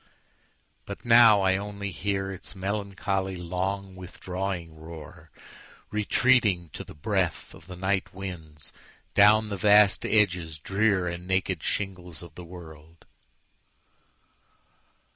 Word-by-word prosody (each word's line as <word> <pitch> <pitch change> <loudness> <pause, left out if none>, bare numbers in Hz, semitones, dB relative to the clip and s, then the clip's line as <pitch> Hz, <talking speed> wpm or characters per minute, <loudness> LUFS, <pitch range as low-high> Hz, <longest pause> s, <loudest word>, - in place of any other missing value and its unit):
But - - -8
now 115 -3 +7
I 95 0 +3
only 100 0 -5
hearIts 95 0 -3
melancholy, 95 -1 -2
long, 95 +2 -3
withdrawing 90 -2 -5
roar, 80 -1 -11 0.6
Retreating, 105 -4 +2
to - - -6
the - - -13
breathOf 75 +2 -2
the 90 - -8
night 95 +1 -1
winds, 85 -6 -9 0.4
down 105 +1 +5
the 100 - -3
vast 105 +1 +5
edges 90 -7 +1
drearAnd 90 -1 0
naked 95 -3 0
shingles 90 -5 -4
of 85 -3 -12
the 90 - -10
world. 80 -2 -13
95 Hz, 105 wpm, -27 LUFS, 85-100 Hz, 0.6 s, now